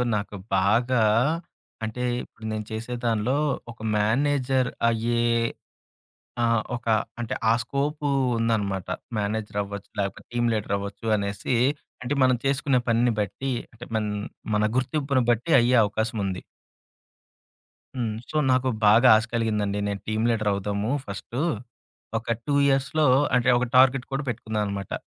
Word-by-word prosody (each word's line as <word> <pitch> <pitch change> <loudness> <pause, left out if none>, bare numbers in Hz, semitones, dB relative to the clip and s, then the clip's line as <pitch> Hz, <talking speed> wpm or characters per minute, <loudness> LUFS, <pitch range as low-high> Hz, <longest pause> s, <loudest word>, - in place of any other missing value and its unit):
నాకు 105 0 -3 0.2
బాగా 120 +5 +3 0.8
అంటే 110 +3 -3 0.2
ఇప్పుడు 110 - -13
నేను 110 0 -3
చేసే 115 +3 -4
దానిలో 115 +3 +1 0.4
ఒక 115 - -16 0.2
మేనేజర్ 130 +4 +1 0.2
అయ్యే 115 +1 0 1.2
ఆహ్, 115 -1 +3
ఒక 120 - -8 0.3
అంటే 120 +1 -3 0.2
ఆ - - +5
స్కోపు 145 +4 -2 0.3
ఉందన్నమాట. 105 -5 0 0.3
మేనేజర్ 105 0 -2
అవ్వచ్చు. 100 0 -7
లేకపోతే, 100 -1 -3
టీమ్ 120 0 +1
లీడర్ 105 -2 -2
అవ్వొచ్చు 100 +3 -7
అనేసి, 100 +3 -2 0.5
అంటే 125 +3 -2
మనం 130 -1 +4
చేసుకునే 135 -1 +2
పనిని 120 +1 +3
బట్టి 120 +7 -2 0.2
అంటే 120 +1 -11
మన 110 - +1 0.5
మన 105 - +2
గుర్తింపును 135 0 +1
బట్టి 120 +8 -1
అయ్యే 120 +1 +3
అవకాశముంది. 105 -3 -2 1.5
హ్మ్. 115 -4 -2
సో, - - -9 0.2
నాకు 130 0 +2 0.2
బాగా 110 +5 +6
ఆశ 110 - -1
కలిగిందండి. 105 -3 0
నేను 100 -1 -4
టీమ్ 110 +1 0
లీడర్ 110 -2 +1
అవుదాము 100 +3 -2
ఫస్టు, 105 +6 -5 0.8
ఒక 115 +1 -2
2 145 - 0
ఇయర్స్‌లో 140 +3 +2 0.3
అంటే 125 0 +3
ఒక 125 - 0
టార్గెట్ 130 0 +5
కూడా 135 +2 -1
పెట్టుకున్నానన్నమాట. 105 -4 -3
115 Hz, 130 wpm, -25 LUFS, 105-130 Hz, 1.5 s, బాగా